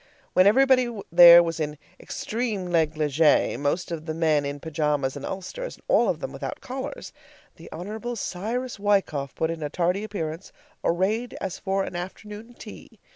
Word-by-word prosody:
When 185 +1 +5
everybody 255 +2 +4 0.2
there 170 0 +10
was 165 0 -3
in 150 -1 -3 0.2
extreme 220 -4 -3
negligee, 155 -3 +2
most 145 +6 -2
of 165 -1 -5
the 155 - -3
men 155 -3 +2
in 140 0 -4
pajamas 150 -3 -1
and 140 - -7
ulsters, 195 - -6
and - - -25
all - - +3
of - - -1
them - - -4
without - - -6
collars, 265 - -7 0.4
the - - -12
Hon. 220 +6 -5
Cyrus 230 +5 -4
Wykoff 195 -9 0
put 160 0 -1
in 165 -1 -6
a 150 - -3
tardy 180 +5 0
appearance, 170 -5 -5 0.3
arrayed 210 +8 0
as 190 - -5
for 195 0 -1
an 180 - -6
afternoon 210 +6 -8
tea. - - -12
180 Hz, 165 wpm, -25 LUFS, 155-215 Hz, 0.4 s, there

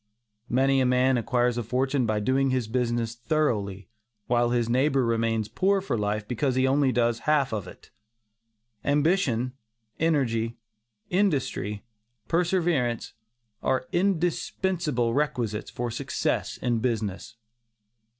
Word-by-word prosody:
Many 135 +2 +3
a - - +3
man 125 +1 +3
acquires 120 0 +1
a - - -2
fortune 130 +2 0
by 110 -1 +1
doing 135 +5 +2
his 130 -3 0
business 120 -1 -1
thoroughly, 115 - -1 0.4
while 120 0 +2
his 120 -1 +1
neighbor 130 +2 +2
remains 115 -2 0
poor 195 - +2
for 190 -10 -2
life 105 -1 -2
because 130 +2 0
he 130 0 +3
only 135 +1 +3
half 125 +4 +1
does 105 -4 -3
it. - - -14 0.9
Ambition, 140 - +1 0.5
energy, 120 -8 +1 0.5
industry, 140 - 0 0.4
perseverance, 165 -9 0 0.5
are 130 -1 0
indispensable 175 -7 0
requisites 125 -7 -1
for 120 -1 -4
success - - -2
in 120 -2 0
business. 110 -3 -2
125 Hz, 115 wpm, -26 LUFS, 115-145 Hz, 0.9 s, Many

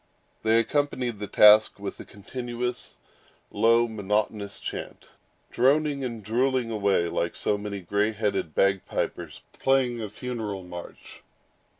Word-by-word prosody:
They 110 +1 +3
accompanied 125 -2 0
the 105 - -4
task 105 +1 +6
with 100 0 -6
a - - -8
continuous, 120 - -5 0.6
low, 115 +2 +4
monotonous, 105 -1 -2
chant; - - -7 0.4
droning 140 +2 +2
and 115 -4 -5
drilling 125 +2 0
away 100 -5 +1
like 85 0 -2
so 105 - 0
many 100 -1 -5
gray 100 +4 0
headed 105 -7 -2
bag 95 -1 +2
pipers - - -4 0.2
playing 130 -3 +2
a 105 - -4
funeral 110 -4 -5
march. 90 -1 -10
110 Hz, 125 wpm, -26 LUFS, 100-120 Hz, 0.6 s, task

